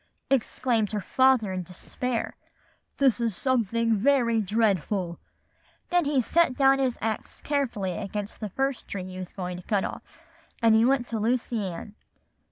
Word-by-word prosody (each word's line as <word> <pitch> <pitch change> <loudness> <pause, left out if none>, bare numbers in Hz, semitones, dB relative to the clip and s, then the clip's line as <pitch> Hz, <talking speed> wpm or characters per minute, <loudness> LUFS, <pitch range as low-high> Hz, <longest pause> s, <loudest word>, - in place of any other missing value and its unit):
exclaimed 235 -4 +1
her 210 - 0
father 255 -2 +3
in 185 - -2
despair, 225 +7 -4 0.6
'this 265 -4 +3
is 230 -4 0
something 230 -3 +1
very 235 0 +3
dreadful.' 200 -4 0 0.7
Then 350 -2 +2
he 280 -3 +2
set 330 -1 +2 0.2
his 260 -3 0
axe 220 -1 -3
carefully 235 -11 -1
up 215 - -4
against 205 +1 -5
the 215 - -4
first 270 +5 -2
tree 190 -2 -5
he 185 0 -8
was 185 -1 -7
going 180 -2 -5
to 180 - -10
cut 205 -3 +1
off, - - -5 0.6
and 225 -1 +5
he 220 +1 +5
went 260 -1 +2
to 225 - -2
Lucy 230 0 0
Ann. 185 +4 -7
225 Hz, 160 wpm, -26 LUFS, 200-255 Hz, 0.7 s, and